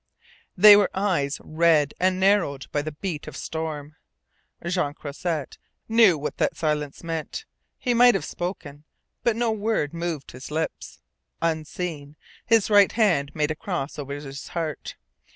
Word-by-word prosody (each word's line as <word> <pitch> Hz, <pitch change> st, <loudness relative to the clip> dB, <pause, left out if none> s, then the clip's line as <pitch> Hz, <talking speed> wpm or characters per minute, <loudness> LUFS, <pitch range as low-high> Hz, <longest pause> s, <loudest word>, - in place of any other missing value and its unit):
They 205 Hz, +2 st, +10 dB
were 205 Hz, -1 st, +4 dB
eyes 180 Hz, -8 st, 0 dB
red 155 Hz, -2 st, +3 dB
and 185 Hz, 0 st, +2 dB
narrowed 190 Hz, -8 st, +2 dB
by 145 Hz, -, 0 dB
the 155 Hz, +1 st, -5 dB
beat 155 Hz, -1 st, -5 dB
of -, -, -7 dB
storm. 155 Hz, -1 st, -5 dB, 0.7 s
Jean 170 Hz, -5 st, -1 dB
Croisset 155 Hz, 0 st, -4 dB, 0.3 s
knew 225 Hz, -7 st, +5 dB
what 150 Hz, -, -5 dB
that -, -, 0 dB
silence 150 Hz, -2 st, -2 dB
meant. 165 Hz, -, -4 dB, 0.3 s
He 245 Hz, -, 0 dB
might 240 Hz, -1 st, +6 dB
have 195 Hz, -, -2 dB
spoken. 155 Hz, -5 st, -6 dB, 0.4 s
But 235 Hz, -2 st, +1 dB
no 235 Hz, 0 st, +1 dB
word 210 Hz, -8 st, -1 dB
moved 170 Hz, -4 st, -4 dB
his 130 Hz, +1 st, -10 dB
lips. 155 Hz, -, -4 dB, 0.4 s
Unseen, 160 Hz, -2 st, -3 dB, 0.3 s
his 225 Hz, -3 st, +4 dB
right 205 Hz, -1 st, +6 dB
hand 175 Hz, -11 st, +2 dB
made 150 Hz, -1 st, 0 dB
a -, -, -2 dB
cross 155 Hz, -5 st, -4 dB
over 140 Hz, 0 st, -5 dB
his 140 Hz, -1 st, -8 dB
heart. 160 Hz, -3 st, -4 dB
160 Hz, 150 wpm, -25 LUFS, 145-195 Hz, 0.7 s, They